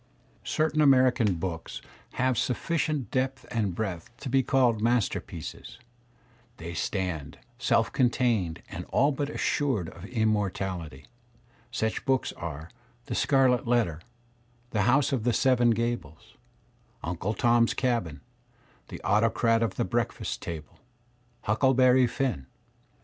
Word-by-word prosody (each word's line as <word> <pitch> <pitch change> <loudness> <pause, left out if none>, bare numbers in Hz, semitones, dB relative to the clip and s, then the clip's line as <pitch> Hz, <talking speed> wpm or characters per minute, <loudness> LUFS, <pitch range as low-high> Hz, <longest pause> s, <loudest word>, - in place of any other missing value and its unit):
Certain 155 0 +1
American 130 -7 +4
books 80 -1 -5 0.3
have 130 0 +1
sufficient 150 +3 -1
depth 130 0 -1
and 105 -6 -1
breadth 95 -6 -4
to 135 - -6
be 135 +1 +3
called 125 -4 +2
masterpieces; 120 -1 -2 0.8
they 85 +1 -7
stand 85 -7 -3 0.2
self - - +2
contained 120 -9 +1
and - - -6
all 140 +3 +2
but 140 +1 -2
assured 130 - 0
of 90 - -11
immortality; 95 - -2 0.6
such 110 -3 -2
books 135 -2 +1
are 80 -1 -7 0.3
"The - - -5
Scarlet 130 -4 +3
Letter," 110 -10 +1 0.7
"The 105 0 +2
House 140 +2 +3
of 130 -5 0
the 120 0 +2
Seven 125 -2 +3
Gables," 115 -9 -3 0.7
"Uncle 90 +6 -2
Tom's 120 -2 +3
Cabin," 115 - -1 0.7
"The - - -8
Autocrat 115 +2 +2
of 115 - 0
the - - 0
Breakfast - - -2
Table," 80 -3 -7 0.6
Huckle 130 +5 +2
berry 130 0 +5
Finn." 120 - -2
115 Hz, 120 wpm, -27 LUFS, 95-130 Hz, 0.8 s, berry